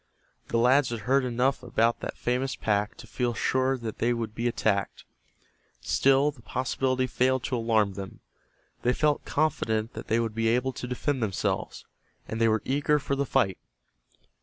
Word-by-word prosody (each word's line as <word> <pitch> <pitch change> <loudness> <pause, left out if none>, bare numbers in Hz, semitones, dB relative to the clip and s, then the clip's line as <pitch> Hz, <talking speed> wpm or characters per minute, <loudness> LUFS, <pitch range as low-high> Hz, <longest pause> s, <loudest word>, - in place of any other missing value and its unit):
The - - 0
lads 125 +3 +4
had 115 -2 -4
heard 135 +5 +2
enough 125 +2 0
about 115 -1 +1
that - - -6
famous 125 +2 -1
pack 105 0 0
to - - -11
feel 120 -2 -2
sure 130 +3 +1
that 115 -3 -6
they 120 +1 +2
would 115 -2 -4
be 115 +2 -1
attacked. 105 -4 -1 0.7
Still 135 +2 +3
the 135 -5 -18
possibility 130 +3 -1
failed 130 0 +1
to 130 - -1
alarm 110 -4 +2
them. 95 0 -8 0.6
They 125 - +2
felt 150 +2 +1
confident 115 -7 0
that - - -8
they 115 - +2
would 115 -2 -1
be 115 +1 0
able 125 +3 +1
to 125 - -6
defend 130 +2 -2
themselves, 105 -4 -2 0.4
and 115 0 -4
they 115 - +5
were 110 -1 +1
eager 145 +2 +2
for 140 -1 -2
the 140 0 -1
fight. 95 -5 +1
120 Hz, 175 wpm, -27 LUFS, 115-130 Hz, 0.7 s, they